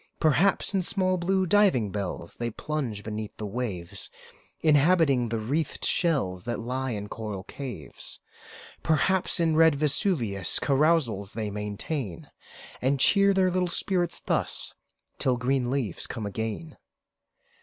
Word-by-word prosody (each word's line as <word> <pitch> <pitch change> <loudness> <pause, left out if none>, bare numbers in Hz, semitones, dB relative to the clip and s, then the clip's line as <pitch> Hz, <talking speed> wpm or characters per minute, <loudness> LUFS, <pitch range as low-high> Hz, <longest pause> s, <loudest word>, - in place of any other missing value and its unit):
Perhaps, 165 +7 +3
in 195 - +2
small, 185 0 +1
blue 190 +2 +1
diving 180 - +3
bells 95 -4 -4
They 120 0 -2
plunge 120 -4 -4
beneath 110 -1 -6
the 110 - -5
waves, 100 -4 -4 0.5
Inhabiting 150 -5 +4
the 115 - -1
wreathed 140 +8 -2
shells 110 - 0
That 120 - -2
lie 130 +3 -3
in 105 -3 -4
coral 105 -3 -5
caves. 130 +1 -7 0.6
Perhaps, 175 +5 +2
in 165 -2 +2
red 160 -1 +6
Vesuvius 140 - +1
Carousals 135 -9 +1
they 110 -2 -3
maintain; 105 - -4 0.5
And 135 +2 +1
cheer 200 +7 +5
their 190 -1 +3
little 180 0 +1
spirits 175 0 -1
thus, - - 0 0.5
Till 130 -2 +1
green 125 0 0
leaves 125 -9 -2
come 115 -4 -5
again. 110 +9 -4
130 Hz, 130 wpm, -27 LUFS, 110-165 Hz, 0.6 s, red